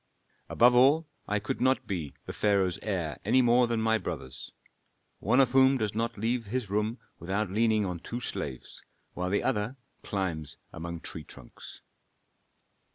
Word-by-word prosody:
"Above 120 +1 +5
all, 140 +6 +5 0.2
I 105 - +1
could 130 +6 -3
not 130 0 +2
be 85 -9 -4
the - - -6
pharaoh's 100 -4 +1
heir 90 -8 -2
any 125 +5 +4
more 120 +1 +4
than 115 -1 0
my 110 0 +2
brothers, 65 -8 -6 0.7
one 115 +7 +2
of 130 -3 +4
whom 135 +1 +5
does 110 -4 -1
not 115 +1 -2
leave 115 +3 -1
his 115 -2 -3
room 105 +3 0 0.2
without 95 +3 -2
leaning 110 0 +2
on 90 -2 -3
two 120 +8 -5
slaves, 70 - -5 0.3
while 90 +1 -2
the 100 - +1
other 115 0 0 0.3
climbs 85 -7 -3 0.2
along 85 0 -6
tree 80 - -5
trunks." 65 - -11
105 Hz, 160 wpm, -29 LUFS, 90-120 Hz, 0.7 s, Above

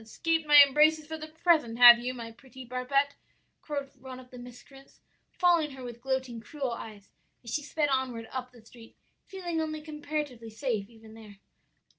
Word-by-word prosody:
escaped 325 +8 -2
my 295 -1 +10
embraces 305 +3 +3
for 320 +1 -6
the 310 0 -8 0.2
present, 300 -10 +3
have 240 -1 +10
you, 245 +1 -3
my 230 -2 -8
pretty 260 +2 -14
barbet?' 255 +3 0 0.5
cried 285 -2 -4
one 255 0 -10
of 250 -1 -16
the 250 - -11
miscreants, 250 +3 -15 0.4
following 345 -4 +3
her 265 -2 -11
with 240 -1 -9
gloating, 260 -3 -3
cruel 270 +2 -5
eyes 215 -3 -9 0.3
as 235 - -7
she 300 - -1
sped 295 +1 -1
onward 255 -4 -2
up 255 -1 -5
the 235 -3 -19
street, 230 -1 -16 0.3
feeling 350 -4 -4
only 310 -1 -4
comparatively 300 -6 -6
safe 220 -3 -3
even 225 -1 -16
there. 215 -2 -13
260 Hz, 175 wpm, -28 LUFS, 235-300 Hz, 0.5 s, my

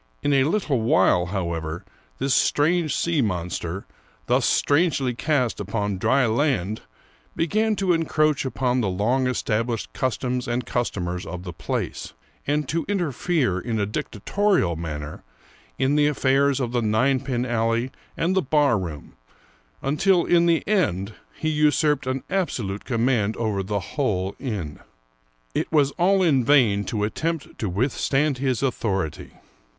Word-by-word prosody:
In 145 - +2
a 135 -1 +4
little 155 - 0
while, 90 -5 +3
however, 85 -3 -3 0.3
this 135 0 0
strange 160 +3 +2
sea 165 -4 +1
monster, 90 -2 -3 0.4
thus - - +2
strangely 145 -4 +2
cast 130 -1 0
upon 100 -1 -2
dry 135 +6 +3
land, 110 - 0 0.5
began 215 +6 +1
to 190 -3 +1
encroach 155 -3 +1
upon 130 -1 0
the 105 - 0
long 120 +8 +1
established 115 -2 -1
cus 130 -3 -1
toms 125 0 -2
and 120 0 -1
customers 90 -8 -2
of 90 0 -7
the 90 -2 -7
place, - - -4 0.3
and 150 0 0
to 165 +3 -1
interfere 160 - 0
in 110 +2 -2
a 100 - +1
dicta 105 +1 -5
torial 195 - +1
manner 75 -2 -6 0.6
in 135 +2 +2
the 150 0 +4
affairs 140 -1 +2
of 125 -3 -2
the 120 -1 0
ninepin 125 +3 +1
alley 115 +1 0 0.3
and 180 +3 +1
the 190 - +3
bar 145 - +2
room, 80 -6 -7 0.7
until 170 +6 +2
in 170 -1 +4
the 165 -2 +2
end 110 - 0 0.2
he 155 - -3
usurped 150 -2 +2
an 130 0 -2
absolute 115 - -2
command 115 -3 +1
over 110 -4 -1
the 100 +2 -2
whole 100 -9 -1
inn. 100 - -4 0.7
It - - -2
was 145 -3 +3
all 190 +4 +2
in 140 -7 +3
vain 115 -7 +4
to 105 +1 -2
attempt 160 +8 -3
to 105 - -1
withstand 135 +6 0
his 130 -2 0
authority. 95 - -2
125 Hz, 145 wpm, -24 LUFS, 105-150 Hz, 0.7 s, a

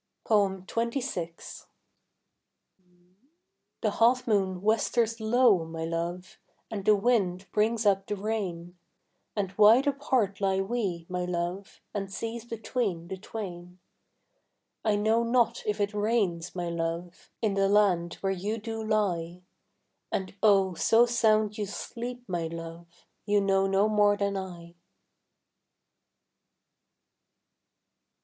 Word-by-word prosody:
XXVI. 205 -1 -1 2.2
The - - +1
half 250 +2 +3
moon 190 -4 +1
westers 225 +1 +1
low, 220 -4 +4
my 160 0 -5
love, 170 +2 -4 0.3
And 200 -3 -4
the 215 - +6
wind 195 -4 +1
brings 220 +1 +1
up 195 -1 +2
the 210 - -2
rain; 185 -4 -4 0.6
And 195 -2 -2
wide 225 +6 +7
apart 260 -8 0
lie 195 -1 +2
we, 195 -5 -2
my 180 -1 -2
love, 180 +2 -4
And 195 -1 -4
seas 230 +3 -5
between 220 -7 -3
the 190 - -4
twain. 180 -4 -7 1.1
I 215 -2 +2
know 220 +3 +2
not 235 0 +2
if 210 0 -1
it 205 +1 0
rains, 205 -6 0
my 175 -1 -3
love, 170 +1 -4
In 215 -3 +2
the 195 0 +2
land 185 -5 +3
where 195 - 0
you 205 +4 -3
do 225 0 -5
lie; 180 -5 -1 0.7
And 190 -1 -3
oh, 195 -3 +4
so 225 +7 +4
sound 215 -3 +2
you 205 - -2
sleep, 245 +4 -6
my 175 -3 -2
love, 165 +1 -9 0.2
You 205 0 +4
know 195 -1 +2
no 195 +2 +3
more 205 -1 +3
than 200 -1 -1
I. 175 -3 -7
200 Hz, 120 wpm, -28 LUFS, 180-220 Hz, 2.2 s, wide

